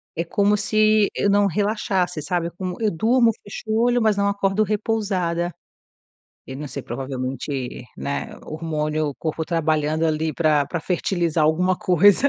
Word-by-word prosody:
É 165 - -1
como 205 +4 +2
se 215 0 +3
eu 200 - +1
não 205 0 +4
relaxasse, 190 -3 0
sabe, 170 +2 -1
como 185 -2 -4
eu 215 - +3
durmo 230 +7 +3
fecho 205 - -8
olho 240 +2 +3
mas 215 -2 +2
não 200 0 +2
acordo 200 +1 +1
repousada, 195 -5 -1 0.9
Eu 130 - -7
não 150 +1 -6
sei, 140 -1 -6
provavelmente, 130 0 -4
né, 140 - -4
hormônio, 155 -1 -2
o 140 - -5
corpo 160 0 -3
trabalhando 155 -1 0
ali 155 0 0
pra 150 -4 +2
pra 175 +2 -3
fertilizar 170 -2 0
alguma 180 +4 +2
coisa. 200 - +4
175 Hz, 150 wpm, -22 LUFS, 155-205 Hz, 0.9 s, não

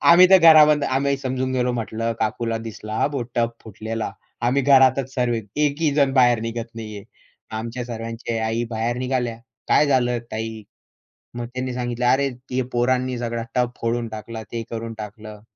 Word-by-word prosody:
आम्ही 180 +2 +7
तर 190 - +9
घरामध्ये 150 -3 +7
आम्ही 140 +1 +1
समजून 130 -1 -2
गेलो 125 -1 +1
म्हटलं, 115 -1 -2
"काकूला 115 +1 -1
दिसला 110 -1 -7
हां - - +2
बो, 140 -4 -2
टब 120 -1 +1
फुटलेला." 110 +1 -4 0.4
आम्ही 140 +2 +2
घरातच 135 -1 +4
सर्व. 125 -2 +1
एकही 145 +8 0
जण 140 -2 +3
बाहेर 120 -3 +5
निघत 115 0 -5
नाहीये. 110 -3 -7 0.5
आमच्या 115 +3 -4
सर्वाच्या 115 -1 -4
आई 115 +1 -1
बाहेर 115 +1 -1
निघाल्या, 125 -2 -1 0.3
"काय 150 - +5
झालं 125 -3 +2
ताई?" 110 0 -4 0.7
मग 120 0 -4
त्यांनी 130 0 -3
सांगितलं, 120 0 -2
"अरे, 135 +2 +3 0.2
ते 130 0 0
पोरांनी 125 +1 +1
सगळा 115 -1 -3
टब 125 -1 +1
फोडून 115 0 -1
टाकला 110 +1 -7
ते 115 -1 -3
करून 115 0 -5
टाकलं." 105 0 -9
120 Hz, 160 wpm, -22 LUFS, 115-130 Hz, 0.7 s, तर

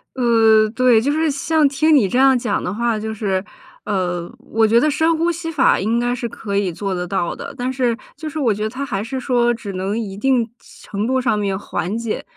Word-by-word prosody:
呃， 225 -3 +4
对， 245 -2 +4
就 280 +5 0
是 315 +1 +1
像 305 +2 +2
听 300 +3 +3
你 240 -9 +4
这 245 +7 0
样 265 -1 +5
讲 225 -4 -1
的 180 - -2
话， 230 0 -1
就 220 +1 -4
是 195 -3 -1 0.4
呃， 180 -4 -2
我 225 0 +1
觉 230 +2 +4
得 305 - +2
深 320 +3 +2
呼 335 +2 +1
吸 330 0 -5
法 305 - +3
应 225 +5 0
该 245 0 0
是 240 -1 -4
可 205 -2 -5
以 200 -3 +1
做 195 +3 -3
得 180 -1 -3
到 175 -2 -2
的， - - -8
但 250 +1 -2
是 245 -3 0 0.2
就 310 +2 -6
是 310 - -7
我 245 -7 +2
觉 210 - -6
得 215 - -1
它 265 +4 -5
还 200 -5 -3
是 260 +4 -4
说 245 -2 +2
只 205 -4 -7
能 190 +4 -2
一 200 -4 -5
定 240 +2 +1 0.4
程 205 +2 -3
度 260 +1 +1
上 240 -4 +1
面 200 -2 -1
缓 195 +1 -3
解， 230 -2 -3
230 Hz, 250 characters per minute, -19 LUFS, 205-265 Hz, 0.4 s, 样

